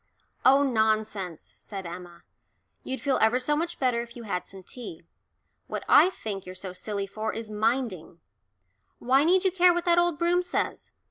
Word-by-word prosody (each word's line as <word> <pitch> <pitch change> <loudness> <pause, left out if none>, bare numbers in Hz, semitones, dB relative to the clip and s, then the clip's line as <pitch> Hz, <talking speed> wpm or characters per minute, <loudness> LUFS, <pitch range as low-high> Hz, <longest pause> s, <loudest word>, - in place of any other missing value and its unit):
"Oh, 275 +2 +6
nonsense," 215 - -1
said 195 -3 -8
Emma. 175 0 -9 0.6
"You'd 260 -2 -4
feel 275 0 +1
ever 220 +3 +4
so 255 +4 0
much 335 +3 -2
better 250 -3 +1
if 235 0 -10
you 240 - -8
had 195 -4 -3
some 190 -1 -11
tea. 180 -6 -9 0.6
What - - -4
I 365 - +7
think 205 - -6
you're 185 - -8
so 185 0 -7
silly 200 +1 -3
for 215 +3 -4
is 225 -1 -6
minding 215 -6 -1 0.8
why 265 +3 +3
need 360 +3 +4
you 380 - +2
care 355 -1 +5
what 345 - -2
that 345 0 +4
old 345 -3 +2
Broom 345 +2 +2
says? 360 - -3
230 Hz, 180 wpm, -27 LUFS, 195-295 Hz, 0.8 s, I